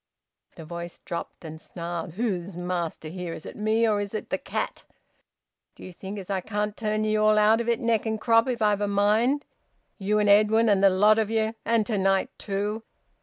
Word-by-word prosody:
The 165 Hz, -, -10 dB
voice 170 Hz, +1 st, -7 dB
dropped 170 Hz, 0 st, -6 dB
and 160 Hz, 0 st, -8 dB
snarled. 170 Hz, -1 st, -6 dB
"Who's 190 Hz, -4 st, -3 dB
master 175 Hz, -3 st, -3 dB
here? 175 Hz, 0 st, -5 dB
Is -, -, -10 dB
it -, -, -8 dB
me, 220 Hz, +2 st, +1 dB
or 210 Hz, -2 st, +1 dB
is 205 Hz, +1 st, -5 dB
it 215 Hz, -, -5 dB
the -, -, 0 dB
cat? -, -, -4 dB, 0.9 s
D'ye 185 Hz, -, -10 dB
think 190 Hz, +3 st, -8 dB
as 190 Hz, -3 st, -7 dB
I 195 Hz, -2 st, -1 dB
can't 210 Hz, +1 st, -3 dB
turn 215 Hz, -1 st, -1 dB
ye 215 Hz, 0 st, +1 dB
all 215 Hz, 0 st, +4 dB
out 215 Hz, +2 st, +4 dB
of 235 Hz, -, -3 dB
it 235 Hz, -, +1 dB
neck 230 Hz, -2 st, 0 dB
and 220 Hz, 0 st, -1 dB
crop, 230 Hz, +1 st, +3 dB
if 235 Hz, -3 st, -1 dB
I've 210 Hz, -1 st, +2 dB
a 205 Hz, -, +1 dB
mind? 215 Hz, +8 st, +2 dB, 0.5 s
You 205 Hz, +2 st, +1 dB
and 210 Hz, 0 st, +2 dB
Edwin, 215 Hz, +2 st, +5 dB
and 200 Hz, -1 st, +3 dB
the 195 Hz, -, +8 dB
lot 210 Hz, +4 st, +4 dB
of 215 Hz, -2 st, 0 dB
ye! 220 Hz, 0 st, 0 dB
And 230 Hz, -2 st, +2 dB
to 210 Hz, -3 st, -1 dB
night 195 Hz, 0 st, +1 dB
too! 205 Hz, +2 st, -2 dB
210 Hz, 210 wpm, -26 LUFS, 190-220 Hz, 0.9 s, the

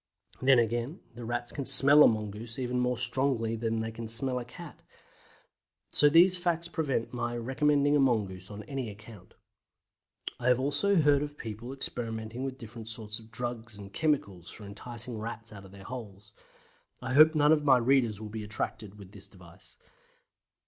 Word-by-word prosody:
Then 130 Hz, 0 st, +5 dB
again, 120 Hz, -, -1 dB
the 120 Hz, +1 st, -9 dB
Rats 120 Hz, +1 st, -2 dB
can 140 Hz, -, -4 dB
smell 145 Hz, +3 st, +6 dB
a -, -, +9 dB
mongoose 110 Hz, +2 st, -4 dB
even 125 Hz, -1 st, -2 dB
more 125 Hz, 0 st, 0 dB
strongly 120 Hz, -2 st, +1 dB
than 115 Hz, 0 st, -2 dB
they 110 Hz, 0 st, -4 dB
can 115 Hz, 0 st, -7 dB
smell 125 Hz, +3 st, -1 dB
a 120 Hz, -, -7 dB
cat. 170 Hz, +6 st, -12 dB, 1.1 s
So 145 Hz, -, +7 dB
these 175 Hz, +4 st, +5 dB
facts 170 Hz, -1 st, -1 dB
prevent 140 Hz, -8 st, -2 dB
my 120 Hz, -1 st, -3 dB
recommending 145 Hz, +4 st, +1 dB
a -, -, +3 dB
mongoose 100 Hz, -8 st, 0 dB
on 105 Hz, 0 st, -8 dB
any 130 Hz, +1 st, -5 dB
account. 105 Hz, -2 st, -14 dB, 1.0 s
I 125 Hz, -, -3 dB
have 125 Hz, -1 st, +4 dB
also 145 Hz, +9 st, +1 dB
heard 145 Hz, -4 st, +4 dB
of 145 Hz, 0 st, -6 dB
people 115 Hz, +2 st, -7 dB
experimenting 115 Hz, -3 st, -4 dB
with 135 Hz, -1 st, -4 dB
different 115 Hz, -1 st, -10 dB
sorts 110 Hz, -1 st, -5 dB
of 110 Hz, 0 st, -16 dB
DRUGS 120 Hz, -3 st, -5 dB
AND 100 Hz, -1 st, -11 dB
CHEMICALS 100 Hz, -, -1 dB
for 105 Hz, -, -11 dB
enticing 115 Hz, +3 st, -4 dB
Rats 110 Hz, 0 st, -7 dB
out 100 Hz, -1 st, -11 dB
of 95 Hz, -, -14 dB
their 100 Hz, 0 st, -13 dB
holes. 105 Hz, -4 st, -9 dB, 0.7 s
I 130 Hz, -, -4 dB
hope 155 Hz, +3 st, +7 dB
none 150 Hz, 0 st, +4 dB
of 155 Hz, -2 st, +3 dB
my 135 Hz, -3 st, +5 dB
readers 120 Hz, -4 st, +2 dB
will 110 Hz, -1 st, -7 dB
be 110 Hz, 0 st, -6 dB
attracted 105 Hz, -1 st, -3 dB
with 100 Hz, -2 st, -13 dB
this 100 Hz, -2 st, -13 dB
device. 85 Hz, -3 st, -15 dB
120 Hz, 175 wpm, -29 LUFS, 110-135 Hz, 1.1 s, a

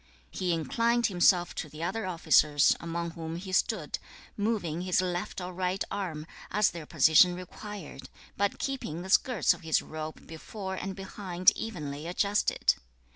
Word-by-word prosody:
2. -, -, -10 dB
He 180 Hz, -1 st, +1 dB
inclined 230 Hz, +9 st, +1 dB
himself 175 Hz, -2 st, +3 dB
to 155 Hz, -, -5 dB
the 155 Hz, +3 st, -7 dB
other 190 Hz, +4 st, -2 dB
officers 155 Hz, -4 st, +4 dB
among 170 Hz, 0 st, -3 dB
whom 165 Hz, 0 st, -6 dB
he 185 Hz, +2 st, -6 dB
stood, 185 Hz, -4 st, 0 dB, 0.4 s
moving 205 Hz, -7 st, -1 dB
his 185 Hz, 0 st, +1 dB
left 180 Hz, 0 st, -2 dB
or 180 Hz, 0 st, -5 dB
right 185 Hz, +1 st, -1 dB
arm, 175 Hz, -7 st, -4 dB, 0.2 s
as 210 Hz, 0 st, +3 dB
their 165 Hz, -3 st, -8 dB
position 160 Hz, +3 st, +5 dB
required, 185 Hz, -3 st, -9 dB, 0.3 s
but 200 Hz, 0 st, 0 dB
keeping 215 Hz, -, -3 dB
the 190 Hz, -, -5 dB
skirts 245 Hz, -1 st, +4 dB
of -, -, -12 dB
his 160 Hz, -2 st, +2 dB
robe 155 Hz, 0 st, -7 dB
before 190 Hz, +4 st, -7 dB
and 190 Hz, 0 st, -4 dB
behind 185 Hz, -2 st, +2 dB
evenly 150 Hz, -8 st, -5 dB
adjusted. 200 Hz, +4 st, +2 dB
180 Hz, 155 wpm, -29 LUFS, 160-195 Hz, 0.4 s, position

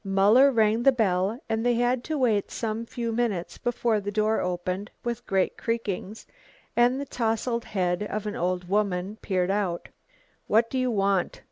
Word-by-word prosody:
Muller 205 Hz, +8 st, +5 dB
rang 220 Hz, -1 st, +3 dB
the 275 Hz, -, +6 dB
bell 205 Hz, -2 st, 0 dB
and 225 Hz, 0 st, -1 dB
they 245 Hz, 0 st, +2 dB
had 245 Hz, +1 st, +1 dB
to 315 Hz, -1 st, -2 dB
wait 225 Hz, -7 st, +1 dB
some 225 Hz, 0 st, -3 dB
few 240 Hz, -2 st, -3 dB
minutes 220 Hz, -7 st, -2 dB
before 235 Hz, -2 st, 0 dB
the 205 Hz, +1 st, -4 dB
door 215 Hz, +1 st, +1 dB
opened 180 Hz, +3 st, -3 dB
with 240 Hz, -1 st, -4 dB
great 190 Hz, -1 st, +1 dB
creakings, 220 Hz, -2 st, -3 dB, 0.5 s
and 245 Hz, +2 st, +3 dB
the 285 Hz, -, -3 dB
towsled 235 Hz, -1 st, -1 dB
head 180 Hz, -2 st, -1 dB
of 215 Hz, 0 st, -3 dB
an 210 Hz, -, -3 dB
old 180 Hz, 0 st, -1 dB
woman 200 Hz, 0 st, -1 dB
peered 185 Hz, -1 st, 0 dB
out. 195 Hz, -4 st, -2 dB, 0.6 s
"What 230 Hz, +2 st, +3 dB
do 260 Hz, -, 0 dB
you 255 Hz, 0 st, +1 dB
want?" 195 Hz, -4 st, 0 dB
215 Hz, 170 wpm, -26 LUFS, 195-240 Hz, 0.6 s, the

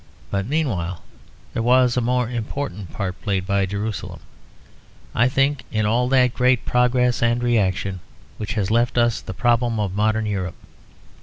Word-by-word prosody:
But 100 Hz, 0 st, -1 dB
meanwhile 100 Hz, -, -1 dB, 0.5 s
there -, -, -1 dB
was 125 Hz, +1 st, +4 dB
a 125 Hz, -, +1 dB
more 125 Hz, 0 st, +1 dB
important 110 Hz, -, -4 dB
part 95 Hz, -3 st, -4 dB
played 95 Hz, -2 st, -1 dB
by 100 Hz, 0 st, +1 dB
Jerusalem, 100 Hz, +2 st, -4 dB, 0.9 s
I 120 Hz, +3 st, +3 dB
think, 135 Hz, +1 st, +1 dB
in 110 Hz, -1 st, 0 dB
all 120 Hz, +4 st, +2 dB
that 125 Hz, -2 st, +4 dB
great 125 Hz, -1 st, +2 dB
progress 125 Hz, 0 st, +2 dB
and 120 Hz, +1 st, +2 dB
reaction 100 Hz, -5 st, 0 dB, 0.4 s
which 110 Hz, 0 st, -4 dB
has 100 Hz, -2 st, -1 dB
left 120 Hz, +1 st, +2 dB
us 120 Hz, -1 st, +2 dB
the 95 Hz, -, -7 dB
problem 120 Hz, 0 st, +1 dB
of 100 Hz, -3 st, -1 dB
modern 110 Hz, +2 st, +1 dB
Europe. 95 Hz, -4 st, -3 dB
115 Hz, 155 wpm, -22 LUFS, 100-125 Hz, 0.9 s, was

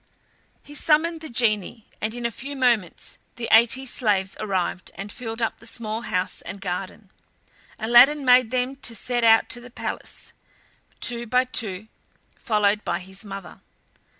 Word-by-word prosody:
He 290 Hz, -, -13 dB
summoned 315 Hz, +2 st, +2 dB
the 315 Hz, -, -8 dB
genie, 225 Hz, -2 st, 0 dB, 0.2 s
and 220 Hz, +2 st, -2 dB
in 240 Hz, -1 st, -5 dB
a 235 Hz, -, 0 dB
few 275 Hz, +5 st, -6 dB
moments 240 Hz, -9 st, 0 dB, 0.2 s
the 235 Hz, -2 st, -4 dB
eighty 235 Hz, +4 st, +5 dB
slaves 205 Hz, -7 st, 0 dB
arrived, 190 Hz, -3 st, -2 dB
and 200 Hz, +1 st, -7 dB
filled 225 Hz, 0 st, -5 dB
up 225 Hz, -, -2 dB
the 230 Hz, -, -8 dB
small 225 Hz, -1 st, -3 dB
house 185 Hz, -5 st, -1 dB
and 195 Hz, +3 st, -8 dB
garden. 190 Hz, +2 st, -5 dB, 0.7 s
Aladdin 255 Hz, +6 st, +6 dB
made 250 Hz, -2 st, +6 dB
them 255 Hz, +2 st, -1 dB
to 245 Hz, -4 st, -2 dB
set 240 Hz, +2 st, -1 dB
out 225 Hz, 0 st, +6 dB
to 240 Hz, -, +1 dB
the 250 Hz, -, -11 dB
palace, 240 Hz, -, -6 dB, 0.7 s
two 235 Hz, 0 st, -1 dB
by 250 Hz, +3 st, +3 dB
two, 215 Hz, -5 st, -1 dB, 0.5 s
followed 210 Hz, -2 st, +1 dB
by -, -, -1 dB
his 190 Hz, +2 st, -7 dB
mother. 195 Hz, -3 st, -9 dB
230 Hz, 155 wpm, -24 LUFS, 205-250 Hz, 0.7 s, Aladdin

